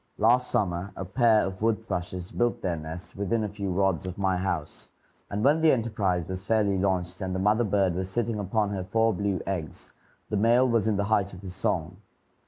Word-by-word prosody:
Last 125 +4 +3
summer 90 0 -1
a 95 - -5
pair 110 +2 +3
of 95 0 -6
wood 110 0 +1
thrushes 90 +1 -4
built 120 -1 0
their 90 -3 0
nest 80 +2 -8
within 100 +3 0
a - - -1
few 100 -1 -4
rods 95 -1 +1
of 90 - -6
my 95 -2 +1
house, 90 -4 -3 0.4
and 105 +1 -2
when 150 +4 +4
the 160 -1 +6
enterprise 105 -8 0
was 95 0 -5
fairly 105 -2 +2
launched 95 -2 -1
and 95 -1 -2
the - - -1
mother 105 +4 +3
bird 100 -4 +2
was 95 +1 -3
sitting 115 +1 -1
upon 100 +1 0
her 95 -2 -3
four 115 +4 +2
blue 100 -1 -1
eggs, 90 -5 -5 0.4
the 105 - +1
male 120 +5 +4
was 115 -3 +2
in 105 -2 +1
the 100 - +1
height 100 -2 +1
of 90 - -11
his 95 -2 -7
song. 90 -4 -2
100 Hz, 210 wpm, -27 LUFS, 95-110 Hz, 0.4 s, the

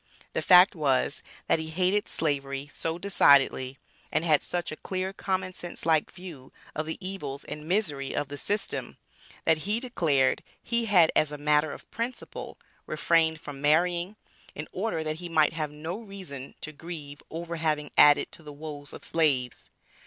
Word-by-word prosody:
The - - 0
fact 180 +1 +7
was, 145 -7 +1 0.2
that - - +3
he 160 0 -4
hated 185 +5 +1
Slavery 140 -2 -2
so 165 0 -2
decidedly 140 -8 +4 0.3
and 155 +2 +1
had 155 -3 +4
such 175 -1 -2
a - - -4
clear 185 +3 -3
common 185 -1 -2
sense 175 -1 -5
like 160 -2 +3
view 170 -8 -10 0.2
of 155 +1 -3
the 160 - -3
evils 185 -8 -4
and 150 +1 -7
misery 155 -8 -1
of 145 0 -1
the 145 - -7
system, 205 +1 -2 0.5
that 160 -1 +4
he 205 +7 0
declared 160 - +1 0.2
he 235 0 +1
had 180 -7 +5
as 155 -1 +3
a 150 - -5
matter 150 +1 +2
of - - -10
principle 235 +2 -5 0.3
refrained 160 -2 +2
from 145 -3 -8
marrying, 175 +6 +2 0.4
in 155 - -5
order 185 -5 -2
that 155 0 -2
he 175 +1 -7
might 155 -2 +3
have 155 -2 -2
no 160 +6 -6
reason 190 - -8
to 155 - -5
grieve 150 -2 -8
over 170 +1 -5
having 150 -2 -1
added 145 0 +6
to - - -9
the 150 -1 -10
woes 145 -1 -7
of - - -9
slaves. 135 -7 +1
160 Hz, 170 wpm, -28 LUFS, 145-180 Hz, 0.5 s, fact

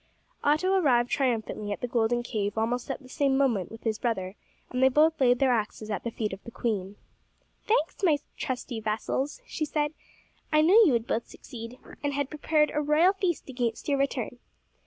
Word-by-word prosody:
Otto 310 +6 +3
arrived 250 -10 +3
triumphantly 225 -5 -1
at 205 - -4
the 245 - -1
golden 240 0 +1
cave 210 -3 -2
almost 240 +4 -1
at 270 +1 -4
the - - -13
same 275 0 +1
moment 235 -10 +1
with 225 - -11
his 220 -2 -1
brother, 195 -6 -2 0.4
and 255 - -1
they 265 - +7
both 310 +3 +3
laid 245 -1 +5
their 270 -1 +3
axes 215 -1 -2
at 205 - -3
the 235 - -2
feet 220 -3 -3
of 190 - -9
the - - -8
queen. 205 -5 -3 0.7
"Thanks, 350 -7 +1
my 330 -7 +4 0.2
trusty 255 -4 -4
vassals," 245 - -2
she 320 - -4
said; 295 0 -1 0.6
"I 305 0 +5
knew 400 +8 +7
you 280 - +3
would 230 -1 +1
both 230 - -2
succeed, 230 +1 -10 0.3
and 285 0 0
had 280 -1 -2
prepared 300 0 +1
a 300 - +1
royal 305 +6 +4
feast 370 -4 -2
against 245 -4 -3
your 280 -2 +1
return." 250 -3 -2
255 Hz, 195 wpm, -28 LUFS, 225-295 Hz, 0.7 s, they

